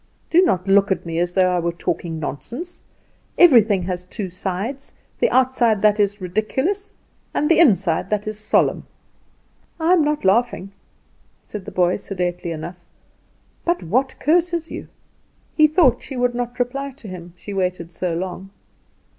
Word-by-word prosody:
Do 345 Hz, -, +6 dB
not 190 Hz, -, +1 dB
look 200 Hz, 0 st, +4 dB
at 190 Hz, -, -1 dB
me 165 Hz, 0 st, -2 dB
as 175 Hz, 0 st, 0 dB
though 185 Hz, -1 st, +3 dB
I -, -, +1 dB
were 170 Hz, 0 st, -1 dB
talking 170 Hz, -1 st, -3 dB
nonsense. 245 Hz, -, -6 dB, 0.6 s
Everything 225 Hz, -, +6 dB
has 180 Hz, 0 st, -3 dB
two 185 Hz, 0 st, -6 dB
sides 200 Hz, +9 st, -4 dB, 0.2 s
the 480 Hz, -, +3 dB
outside 245 Hz, -5 st, +2 dB
that 210 Hz, 0 st, +4 dB
is 205 Hz, 0 st, +1 dB
ridiculous, 265 Hz, -, -2 dB, 0.4 s
and 300 Hz, -, +1 dB
the 330 Hz, -, +4 dB
inside 195 Hz, -, +3 dB
that 210 Hz, 0 st, -1 dB
is 215 Hz, 0 st, -4 dB
solemn." 215 Hz, -, +1 dB, 0.9 s
"I 330 Hz, +3 st, +3 dB
am 340 Hz, -4 st, +4 dB
not 300 Hz, -6 st, -1 dB
laughing," 200 Hz, -1 st, +1 dB, 0.7 s
said 205 Hz, -3 st, -8 dB
the -, -, -7 dB
boy, 180 Hz, 0 st, +2 dB
sedately 180 Hz, -3 st, -3 dB
enough; 170 Hz, +2 st, -7 dB, 0.8 s
"but 345 Hz, 0 st, 0 dB
what 255 Hz, +11 st, 0 dB
curses 335 Hz, +2 st, +1 dB
you?" -, -, -7 dB, 0.7 s
He 310 Hz, -1 st, +6 dB
thought 300 Hz, -6 st, +3 dB
she 270 Hz, -, -8 dB
would 245 Hz, 0 st, +1 dB
not 245 Hz, 0 st, -4 dB
reply 270 Hz, +3 st, -2 dB
to 245 Hz, -4 st, -12 dB
him, 175 Hz, -2 st, -9 dB
she 200 Hz, +3 st, -8 dB
waited 180 Hz, -3 st, -2 dB
so 175 Hz, -1 st, -2 dB
long. 185 Hz, +2 st, -5 dB
205 Hz, 160 wpm, -21 LUFS, 180-270 Hz, 0.9 s, Do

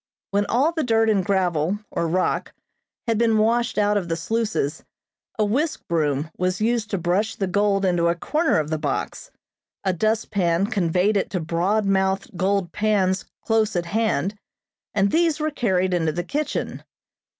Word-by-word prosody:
When 205 Hz, +1 st, +1 dB
all 275 Hz, +7 st, +2 dB
the 325 Hz, -2 st, -2 dB
dirt 225 Hz, -2 st, +3 dB
and 195 Hz, -3 st, +2 dB
gravel, 180 Hz, -2 st, +1 dB
or 170 Hz, -, -1 dB
rock, 185 Hz, +3 st, 0 dB, 0.5 s
had 230 Hz, -3 st, 0 dB
been 225 Hz, -2 st, +3 dB
washed 235 Hz, +3 st, +1 dB
out 205 Hz, 0 st, +3 dB
of 180 Hz, -4 st, -3 dB
the 165 Hz, -, 0 dB
sluices, 205 Hz, -5 st, -2 dB, 0.5 s
a 215 Hz, -, +2 dB
whisk 285 Hz, +10 st, -1 dB
broom 155 Hz, -2 st, 0 dB
was 185 Hz, 0 st, 0 dB
used 225 Hz, -1 st, 0 dB
to 200 Hz, -, -1 dB
brush 185 Hz, +5 st, 0 dB
the 195 Hz, -, -1 dB
gold 200 Hz, +1 st, +1 dB
into 175 Hz, -2 st, +2 dB
a 170 Hz, -, +2 dB
corner 310 Hz, -, +1 dB
of 155 Hz, 0 st, -1 dB
the 155 Hz, -, -1 dB
box, 145 Hz, -3 st, -3 dB, 0.5 s
a 190 Hz, -2 st, +1 dB
dustpan 200 Hz, -3 st, +1 dB
conveyed 195 Hz, -1 st, +1 dB
it 195 Hz, -, -1 dB
to 185 Hz, -, -2 dB
broad 175 Hz, +6 st, 0 dB
mouthed 190 Hz, 0 st, 0 dB
gold 190 Hz, 0 st, 0 dB
pans 195 Hz, -3 st, +1 dB, 0.2 s
close 220 Hz, -2 st, +1 dB
at 175 Hz, -1 st, 0 dB
hand, 205 Hz, -1 st, 0 dB, 0.6 s
and 200 Hz, -1 st, +2 dB
these 325 Hz, -2 st, +2 dB
were 310 Hz, 0 st, -1 dB
carried 190 Hz, -9 st, +1 dB
into 165 Hz, -3 st, +1 dB
the 175 Hz, +3 st, -3 dB
kitchen. 295 Hz, -, -3 dB
195 Hz, 170 wpm, -23 LUFS, 175-220 Hz, 0.6 s, dirt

